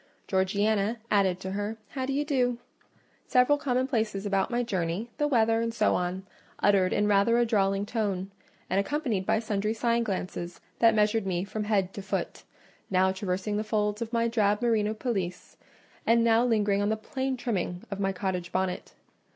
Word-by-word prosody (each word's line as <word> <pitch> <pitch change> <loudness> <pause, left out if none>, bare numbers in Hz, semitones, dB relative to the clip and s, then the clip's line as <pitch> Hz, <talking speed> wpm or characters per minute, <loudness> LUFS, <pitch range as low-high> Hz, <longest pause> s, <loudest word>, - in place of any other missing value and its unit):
Georgiana 200 +3 +1
added 190 -3 +3
to 190 0 -5
her 205 +3 -3
"How 260 +1 -3
d'ye 275 +2 0
do?" 250 -5 +1 0.7
several 255 +4 +4
commonplaces 245 -7 -1
about 195 -1 +1
my 240 0 0
journey, 190 +1 -2
the 295 - +2
weather, 225 -4 +3
and 230 0 -1
so 220 -2 +2
on, 180 +2 -2 0.3
uttered 195 -2 +3
in 210 - +2
rather 205 +3 +4
a 240 - +3
drawling 195 -3 +1
tone: 200 -4 -2 0.4
and 190 - +1
accompanied 230 -5 -1
by - - +3
sundry 215 -1 -1
side 235 +1 +1
glances 180 -3 -4 0.2
that 225 -1 +5
measured 210 -1 +2
me 180 -1 0
from 210 +1 -4
head 195 -3 +1
to 200 - -6
foot—now 190 -1 -2
traversing 190 +2 -2
the 215 - -1
folds 210 0 -1
of 230 -1 -3
my 230 -1 +1
drab 210 -3 +2
merino 220 -2 +1
pelisse, 195 -7 -3 0.5
and 230 0 +4
now 230 0 +4
lingering 210 -4 +2
on 205 - +1
the 220 - 0
plain 265 +3 -3
trimming 190 -7 -2
of 200 - -4
my 195 -1 +1
cottage 180 -2 -3
bonnet. 185 -1 -2
210 Hz, 170 wpm, -28 LUFS, 195-230 Hz, 0.7 s, that